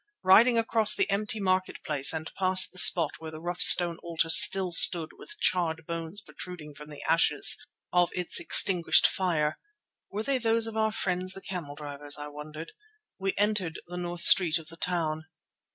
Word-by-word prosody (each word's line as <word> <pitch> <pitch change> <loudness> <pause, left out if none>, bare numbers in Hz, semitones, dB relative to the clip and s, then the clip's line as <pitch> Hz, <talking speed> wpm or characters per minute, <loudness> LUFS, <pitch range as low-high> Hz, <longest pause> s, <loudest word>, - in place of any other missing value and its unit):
Riding 230 +6 +3
across 225 -2 +2
the - - -2
empty 210 +2 -4
market 185 -1 -4
place 140 -3 +1
and 160 0 -8
past 185 -1 +2
the 185 - -1
spot 170 -2 +5
where 160 - -10
the 155 0 -12
rough 175 +2 -7
stone 175 -2 +5
altar 165 -1 -4
still 190 +2 +6
stood 165 -1 +2
with 420 - -11
charred 165 -3 -2
bones 165 +4 -7
protruding 175 -6 -12
from 150 +1 -15
the 150 - -12
ashes 150 -3 +2 0.4
of 180 -1 +1
its 180 -1 -4
extinguished 180 -3 +4
fire—were 190 - -5
they 265 +2 -3
those 225 -1 -1
of 225 -1 -6
our 220 0 -2
friends 185 -2 -4
the - - -11
camel 170 -8 -9
drivers? 145 0 -6
I 150 0 -10
wondered—we 190 - -11
entered 205 -5 -3
the 180 +1 -11
north 175 -1 -7
street 175 -2 +5
of 160 -1 -13
the 165 - -13
town. 160 -3 -4
175 Hz, 170 wpm, -25 LUFS, 160-195 Hz, 0.4 s, still